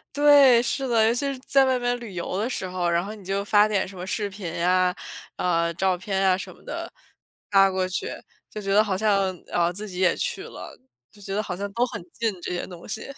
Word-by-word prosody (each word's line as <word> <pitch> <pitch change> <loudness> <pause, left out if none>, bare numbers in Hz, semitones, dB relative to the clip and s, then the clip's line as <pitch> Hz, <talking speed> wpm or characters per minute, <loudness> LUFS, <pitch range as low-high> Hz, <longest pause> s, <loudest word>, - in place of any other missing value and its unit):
对， 285 -4 +7
是 265 +2 -1
的。 225 -2 +4
尤 230 - +3
其 240 - -1
是 260 - -9
在 270 +1 +3
外 260 -1 +2
面 245 0 0
旅 235 -5 -9
游 180 +1 -3
的 220 +5 -1
时 190 -7 -3
候， 180 -1 -1
然 170 +1 +1
后 210 +2 -6
你 205 - -14
就 195 +2 -2
发 205 0 +5
点 210 -3 0
什 190 - -11
么 180 - -6
视 205 +2 -2
频 190 -4 -7
啊， 180 0 +3 0.4
呃， 170 -1 +1
照 185 0 +1
片 195 +2 -2
啊 190 -1 +3
什 190 - -8
么 - - -21
的， - - -6 0.6
发 195 -1 +5
过 185 0 0
去， 185 - -2 0.4
就 215 - -7
觉 195 0 -1
得 210 +2 +6
好 200 -3 -1
像， 195 -2 +2
呃， 175 0 +1
自 205 +4 -6
己 180 -2 -7
也 185 -2 +4
去 - - -2
了， - - -10 0.3
就 205 - -19
觉 195 -1 -6
得 210 - 0
好 180 - -5
像 200 +2 -5
都 240 +4 +1
很 235 - -7
近 215 -6 -3
这 - - -4
些 175 - -3
东 175 -2 -11
西。 220 - -4
195 Hz, 265 characters per minute, -24 LUFS, 185-220 Hz, 0.6 s, 对